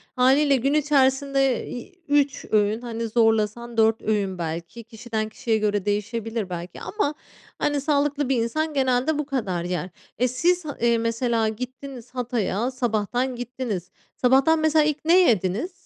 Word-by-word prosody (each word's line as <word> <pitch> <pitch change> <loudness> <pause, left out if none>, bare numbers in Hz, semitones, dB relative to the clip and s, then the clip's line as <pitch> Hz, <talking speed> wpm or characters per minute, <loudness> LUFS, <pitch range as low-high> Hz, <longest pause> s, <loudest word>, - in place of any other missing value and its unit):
Hâliyle 270 +3 +4
gün 275 +3 +1
içerisinde, 275 -3 +2
iii, 355 +9 -9
3 285 -1 +1
öğün, 215 +2 +2
hani, 230 -1 -4
zorlasan 225 +1 +1
4 225 0 +3
öğün 200 -4 -1
belki 170 +7 -5
kişiden 225 -1 -4
kişiye 220 +1 -1
göre 210 -2 0
değişebilir 210 0 -2
belki 175 0 -7
ama, 355 -9 -1 0.5
hani, 290 -1 0
sağlıklı 290 -1 0
bir 270 - +3
insan 310 +6 -2
genelde 265 +2 +1
bu 300 - -2
kadar 205 -11 -2
yer. 180 0 -3 0.3
E, 250 +2 +2
siz, 345 +8 +1 0.2
eee, 235 0 +3
mesela 230 0 0
gittiniz 250 +2 -8
Hatay’a, 240 -1 -1
sabahtan 245 +1 -1
gittiniz. 240 -7 -5 0.2
Sabahtan 270 +6 +4
mesela 315 0 +3
ilk 300 0 -2
ne 345 +3 +6
yediniz? 210 - 0
245 Hz, 145 wpm, -24 LUFS, 220-275 Hz, 0.5 s, ne